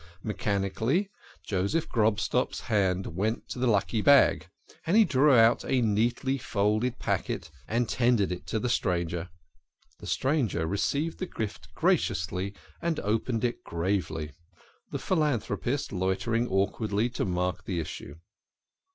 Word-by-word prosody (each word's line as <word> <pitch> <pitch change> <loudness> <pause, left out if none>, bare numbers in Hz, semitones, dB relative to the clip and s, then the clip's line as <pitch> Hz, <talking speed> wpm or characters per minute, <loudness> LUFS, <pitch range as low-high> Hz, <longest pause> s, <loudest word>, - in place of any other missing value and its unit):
Mechanically 110 - -1 0.3
Joseph 100 - 0
Grobstock's 110 -2 +1
hand 95 -4 0
went 110 +5 -1
to - - -5
the 125 - +1
lucky 110 0 +1
bag, 140 +3 +5 0.4
and 185 +6 +4
he 225 - +7
drew 140 -1 +4
out 115 0 +5
a 130 - +1
neatly 120 +5 +1
folded 110 +3 0
packet 80 - -2 0.2
and 115 +1 0
ten 120 +1 +2
dered 100 -3 0
it 90 0 -6
to 110 - -1
the 125 - -1
stranger. 85 -6 -1 0.7
The - - -9
stranger 130 - 0
received 140 - -1
the 185 - -3
gift 110 -9 -6
graciously, 90 +4 0 0.3
and 170 -2 -1
opened 110 +2 -1
it 120 -1 -1
gravely, 85 -3 -2 0.6
the - - -3
philanthropist 140 - -1
loitering 100 +6 0
awkwardly 100 +2 0
to - - -2
mark 90 0 -2
the 95 -6 -2
issue. 75 -2 -6
110 Hz, 135 wpm, -28 LUFS, 95-125 Hz, 0.7 s, he